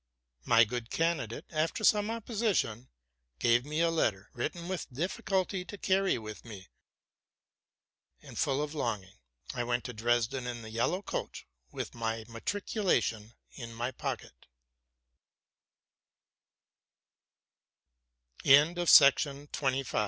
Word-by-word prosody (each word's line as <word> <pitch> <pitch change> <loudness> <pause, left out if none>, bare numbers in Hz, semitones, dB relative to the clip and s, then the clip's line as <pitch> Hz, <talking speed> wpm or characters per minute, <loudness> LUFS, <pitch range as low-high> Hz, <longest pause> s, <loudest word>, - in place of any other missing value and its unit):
My 115 0 +6
good 115 +1 -4
candidate, 160 -9 -1
after 160 +7 -1
some 210 0 +4
opposition, 215 - -1 0.5
gave 120 - +3
me 150 +2 -1
a 170 0 +3
letter, 110 -12 0
written 170 +8 -4
with 185 -6 -4
difficulty, 185 +5 -1
to 205 - -8
carry 190 -2 +2
with 110 -2 -8
me; 100 -5 -11 1.5
and, - - -13
full 140 +2 +1
of 150 0 -5
longing, 105 -10 -3 0.4
I 120 - -2
went 120 0 -1
to 125 - -6
Dresden 120 +3 0
in 120 -1 -5
the 110 - -9
yellow 120 - 0
coach, - - -5 0.3
with - - -5
my 115 -1 -3
matriculation 115 - -1 0.2
in 115 -3 -9
my 120 +3 -2
pocket. - - -6
125 Hz, 105 wpm, -31 LUFS, 115-175 Hz, 1.5 s, My